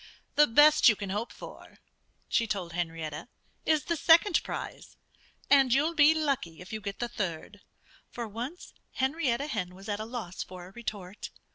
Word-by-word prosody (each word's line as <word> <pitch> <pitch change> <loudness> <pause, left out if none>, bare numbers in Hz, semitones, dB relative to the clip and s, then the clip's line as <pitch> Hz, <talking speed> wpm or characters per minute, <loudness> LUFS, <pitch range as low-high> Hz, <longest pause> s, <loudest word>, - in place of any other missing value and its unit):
"The 295 - +5
best 295 +4 +7
you 215 - +3
can 200 -2 -5
hope 210 +4 -3
for," - - -12 0.5
she 230 -2 +1
told 185 -5 -3
Henrietta, 165 -2 -4 0.4
"is 310 -3 +3
the 335 - -1
second 335 +4 +5
prize. - - -7 0.5
And 270 -3 +5
you'll 295 +6 +3
be 310 0 +6
lucky 275 - -1
if 185 +4 -10
you 215 - -4
get 200 -1 -5
the 240 - -2
third." 205 -3 -5 0.5
For 235 -1 -5
once 245 - -7 0.2
Henrietta 265 -1 0
Hen 185 -10 -4
was 195 +1 -12
at 205 -1 -2
a 215 - -4
loss 220 -6 -6
for 180 -1 -8
a 185 - -13
retort. 205 -3 -7
225 Hz, 170 wpm, -29 LUFS, 190-285 Hz, 0.5 s, best